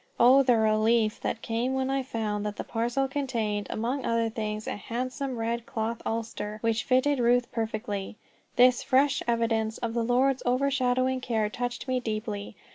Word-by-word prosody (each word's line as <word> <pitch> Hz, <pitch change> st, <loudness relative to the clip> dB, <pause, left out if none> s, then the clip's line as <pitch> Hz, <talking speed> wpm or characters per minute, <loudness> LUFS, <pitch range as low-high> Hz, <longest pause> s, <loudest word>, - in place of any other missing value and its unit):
Oh, 255 Hz, +3 st, +7 dB
the 250 Hz, -3 st, +4 dB
relief 220 Hz, 0 st, +2 dB
that 230 Hz, -, -3 dB
came 240 Hz, +3 st, -1 dB
when 265 Hz, 0 st, 0 dB
I 270 Hz, 0 st, +1 dB
found 215 Hz, -5 st, -3 dB
that 210 Hz, 0 st, -3 dB
the -, -, -4 dB
parcel 240 Hz, +4 st, -1 dB
contained, 235 Hz, -7 st, -2 dB
among 250 Hz, +5 st, -2 dB
other 230 Hz, -1 st, +1 dB
things, 215 Hz, -1 st, -4 dB
a -, -, -3 dB
handsome 255 Hz, +4 st, -4 dB
red 230 Hz, +1 st, -2 dB
cloth 225 Hz, -1 st, -3 dB
ulster, 225 Hz, -2 st, -3 dB
which 225 Hz, -1 st, +1 dB
fitted 260 Hz, +2 st, +2 dB
Ruth 245 Hz, 0 st, +2 dB
perfectly. 215 Hz, -3 st, -3 dB, 0.4 s
This 250 Hz, 0 st, +5 dB
fresh 275 Hz, +1 st, +2 dB
evidence 225 Hz, -2 st, 0 dB
of 230 Hz, -2 st, -3 dB
the 235 Hz, -1 st, 0 dB
Lord's 255 Hz, +3 st, +2 dB
overshadowing 255 Hz, 0 st, +1 dB
care 220 Hz, -4 st, 0 dB
touched 245 Hz, +2 st, -4 dB
me 255 Hz, -1 st, +1 dB
deeply. 215 Hz, -3 st, -4 dB
235 Hz, 165 wpm, -27 LUFS, 220-255 Hz, 0.4 s, Oh